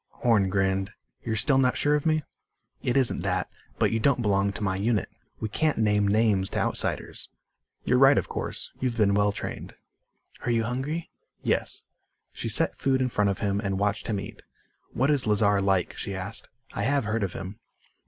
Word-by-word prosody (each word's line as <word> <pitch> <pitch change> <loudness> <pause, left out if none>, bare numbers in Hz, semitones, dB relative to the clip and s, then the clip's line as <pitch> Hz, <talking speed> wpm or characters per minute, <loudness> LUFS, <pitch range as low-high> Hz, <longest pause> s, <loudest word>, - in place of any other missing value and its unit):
Horn 105 -5 +4
grinned. 95 0 0 0.3
"You're 110 -2 -2
still 135 +5 +3
not 125 -1 +2
sure 145 - +2
of 150 +1 +1
me?" 155 -1 +2 0.6
"It 125 +1 0
isn't 130 -3 +3
that. - - -1 0.3
But - - +2
you 115 - 0
don't 125 +1 +2
belong 100 -1 +2
to 105 - -5
my 95 -2 0
unit. 105 +1 0 0.3
We 110 - -2
can't 155 +8 0
name 105 -2 +2
names 105 -2 +2
to - - -4
outsiders." - - -2 0.5
"You're 125 - +2
right, 135 +1 +7
of - - 0
course. - - -4
You've 125 -2 -2
been 100 -3 +3
well 105 0 +3
trained." - - -6 0.7
"Are - - -2
you 115 -1 +2
hungry?" 135 +8 -3 0.3
"Yes." - - -1 0.5
She - - -4
set - - +4
food 135 -1 +1
in 130 -1 +1
front 105 -3 +1
of 100 - -3
him 100 -1 0
and 95 -2 -2
watched 100 +1 -1
him 105 -3 -1
eat. 100 - -9 0.5
"What 135 +4 +1
is 140 -6 +2
Lazar 105 -1 +3
like?" 95 -2 +1
she 100 - -3
asked. 95 +3 -6 0.2
"I - - -3
have 135 +2 +1
heard 110 +1 -1
of 95 -3 -2
him." 95 +3 -7
105 Hz, 195 wpm, -26 LUFS, 100-125 Hz, 0.7 s, right